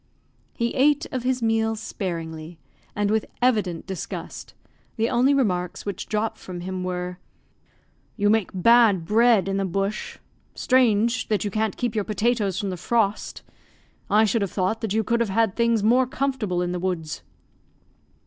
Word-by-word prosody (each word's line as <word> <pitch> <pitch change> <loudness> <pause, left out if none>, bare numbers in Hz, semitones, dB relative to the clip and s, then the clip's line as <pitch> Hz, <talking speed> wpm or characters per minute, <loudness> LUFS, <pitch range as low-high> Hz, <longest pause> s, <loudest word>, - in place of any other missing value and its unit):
He 235 0 -1
ate 290 +3 +3
of 260 -4 -2
his 250 0 -1
meal 225 0 +1
sparingly, 165 -6 -5 0.4
and 205 0 0
with 220 0 0
evident 210 -9 +1
disgust, 190 -2 -7 0.4
the 225 0 0
only 255 +3 +3
remarks 185 -11 0
which 200 -1 -5
dropped 215 0 -2
from 180 -2 -8
him 185 0 -4
were 180 0 -4 1.0
"You 205 -2 +1
make 220 -3 +1
bad 205 -2 +4
bread 220 -1 +4
in 195 0 -1
the 195 - 0
bush. 195 +3 -3 0.4
Strange, 235 -2 +2
that 210 -2 0
you 205 - -2
can't 215 0 -1
keep 240 -3 -1
your 215 -2 0
potatoes 210 -2 0
from 200 -3 -2
the 180 - -5
frost! 215 +2 -1 0.7
I 215 +2 +5
should 220 +2 +1
have 200 - -1
thought 190 +3 -1
that 220 - -3
you 220 +2 +1
could 235 +2 0
have 235 -3 0
had 210 0 +1
things 235 -2 +2
more 245 +4 +4
comfortable 250 -10 -1
in 175 - -2
the 180 - -3
woods." 170 -4 -3
210 Hz, 165 wpm, -24 LUFS, 185-235 Hz, 1.0 s, I